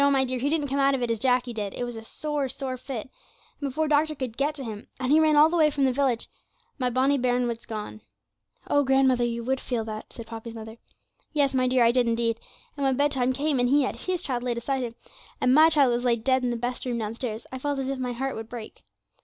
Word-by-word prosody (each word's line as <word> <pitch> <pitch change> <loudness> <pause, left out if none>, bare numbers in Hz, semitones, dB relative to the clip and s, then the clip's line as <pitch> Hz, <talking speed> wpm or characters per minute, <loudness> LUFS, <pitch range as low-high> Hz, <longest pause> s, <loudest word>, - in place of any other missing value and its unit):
my 270 -1 +3
dear, 255 0 -2
he 275 +4 0
didn't 300 -2 0
come 275 +1 -1
out 275 0 +4
of 255 - -2
it 235 - 0
as 225 - -1
Jacky 250 0 +1
did; 205 -3 -4
it - - -3
was 240 -1 -4
a 225 - -8
sore, 295 +2 -2
sore 260 0 -4
fit, 255 -2 -5 0.6
and 285 - -2
before 310 +4 -1
doctor 305 +1 +2
could 255 -5 -5
get 290 +3 0
to 275 - -6
him 215 -3 -7
and 255 0 -1
he 310 - +6
ran 310 -1 +4
all 300 +1 +8
the 335 - -2
way 310 -3 +5
from 280 -2 +1
the 260 - +2
village 260 -3 0 0.5
my 250 -1 +1
bonny 265 +3 +2
bairn 245 0 +1
was 235 -1 -5
gone.' 210 - -6 0.7
'Oh, 285 - +3
grandmother, 265 -2 +3
you 235 0 -2
would 265 +2 -1
feel 235 -3 -2
that,' 215 -1 -7
said 230 - -9
Poppy's 225 0 -8
mother. 220 0 -9 0.6
'Yes, 285 -3 +2
my 255 -1 +2
dear, 250 -1 +3
I 230 - +5
did 245 -1 +2
indeed; 230 0 0 0.4
and 285 - -3
when 265 -2 +2
bedtime 270 -3 +2
came, 280 +1 0
and 245 0 +2
he 285 +1 +4
had - - -2
his 365 -1 -3
child 250 -4 -1
laid 245 -1 -2
aside 265 +3 -1
him, 235 -2 -4 0.4
and 255 - +3
my 310 +3 +7
child 285 -5 +4
was 240 +1 -1
laid 235 -3 +1
dead 260 0 +2
in 250 - +1
the 240 - -1
best 245 +2 -3
room 245 -2 -2
downstairs, 225 +1 -4
I 260 - -5
felt 285 +1 -2
as 270 -1 -2
if 270 -1 -3
my 250 -1 -2
heart 270 +3 -3
would 225 0 -7
break. 235 -3 -9
255 Hz, 260 wpm, -26 LUFS, 235-275 Hz, 0.7 s, all